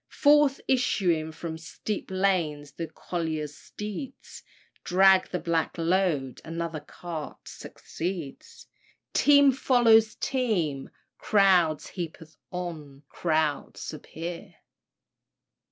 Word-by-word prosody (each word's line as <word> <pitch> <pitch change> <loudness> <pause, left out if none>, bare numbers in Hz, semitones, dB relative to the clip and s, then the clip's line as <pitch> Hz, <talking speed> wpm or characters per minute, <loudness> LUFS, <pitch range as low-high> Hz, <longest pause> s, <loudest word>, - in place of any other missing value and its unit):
Forth 290 -1 +4
issuing 180 -11 +1
from 160 0 -6
steep 200 +6 -5
lanes, 175 -7 0
the 165 +3 -5
collier's 155 -3 -4
steeds 210 +6 -8 0.4
Drag 190 +1 +5
the 180 - -2
black 165 0 -1
load; 165 -7 0
another 165 -1 -4
cart 155 +1 -8
succeeds; 170 -5 -7 0.5
Team 285 -1 +6
follows 235 -4 +4
team, 185 - -1 0.3
crowds 185 -7 +3
heap'd 160 -3 -7 0.2
on 155 -6 -6
crowds 155 -3 -1
appear." 165 +2 -7
170 Hz, 90 wpm, -27 LUFS, 155-195 Hz, 0.5 s, Team